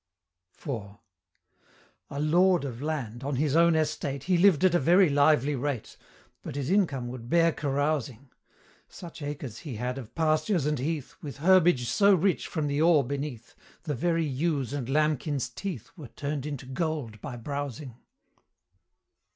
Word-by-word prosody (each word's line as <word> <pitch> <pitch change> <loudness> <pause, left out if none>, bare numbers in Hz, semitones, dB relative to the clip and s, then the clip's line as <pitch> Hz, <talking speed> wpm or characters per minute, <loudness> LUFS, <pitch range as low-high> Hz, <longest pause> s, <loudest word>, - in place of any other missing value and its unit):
IV. 105 -8 -6 1.1
A 140 - -5
Lord 175 +2 +3
of 125 -2 -6
Land, 135 -6 -4
on 140 0 -2
his 145 +2 0
own 170 0 +5
estate, 150 -3 -1
He 185 +3 +1
lived 175 -3 +4
at 185 - +4
a 175 - +4
very 175 +5 +5
lively 145 0 +3
rate, 135 -2 -3 0.5
But - - -7
his 140 +2 -2
income 145 -11 +1
would 120 -1 -8
bear 165 +1 +4
carousing; 140 -3 -2 0.6
Such 170 -3 -11
acres 145 -6 -6
he 145 -8 -7
had 125 +4 -3
of 115 -5 -11
pastures 160 +1 +1
and 150 -2 0
heath, 150 0 -3
With 145 -4 -7
herbage 175 -5 +4
so 200 - +4
rich 185 +2 0
from 155 -3 -2
the 145 +1 0
ore 160 -3 +5
beneath, 135 -3 -5 0.3
The 155 -4 -2
very 165 +5 0
ewe's 140 -1 -1
and 135 -4 -4
lambkin's 150 -2 0
teeth 155 - -6
Were 150 -7 -9
turn'd 145 +2 -4
into 140 -3 -6
gold 135 - -3
by 140 -4 -6
browsing. 140 0 -5
145 Hz, 155 wpm, -28 LUFS, 130-160 Hz, 1.1 s, own